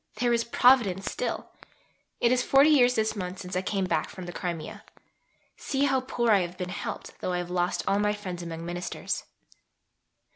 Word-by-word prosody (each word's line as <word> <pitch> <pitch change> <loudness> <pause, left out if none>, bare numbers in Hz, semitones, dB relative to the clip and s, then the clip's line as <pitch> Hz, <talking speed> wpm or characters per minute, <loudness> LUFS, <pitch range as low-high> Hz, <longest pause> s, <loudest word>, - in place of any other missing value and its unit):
There 240 -1 +1
is 235 0 +2
Providence 235 -6 +3
still. - - -3 0.7
It 235 - +3
is 255 0 +3
40 275 +4 +5
years 250 -4 +5
this 220 0 0
month 185 -2 -4
since 180 -1 -7
I 185 - +1
came 195 0 -1
back 165 -3 0
from 185 - -8
the 175 - -7
Crimea. 170 -3 -5 0.7
See 275 -1 -1
how 270 -2 +2
poor 240 -2 0
I 205 - +6
have 175 0 -4
been 180 -1 -4
helped, 185 - -5
though 180 - -2
I - - 0
have 175 0 -4
lost 180 0 0
all 200 - +2
my 210 0 +2
friends 185 -4 -6
among 165 -1 -6
Ministers. 175 +1 -4
195 Hz, 190 wpm, -27 LUFS, 180-240 Hz, 0.7 s, I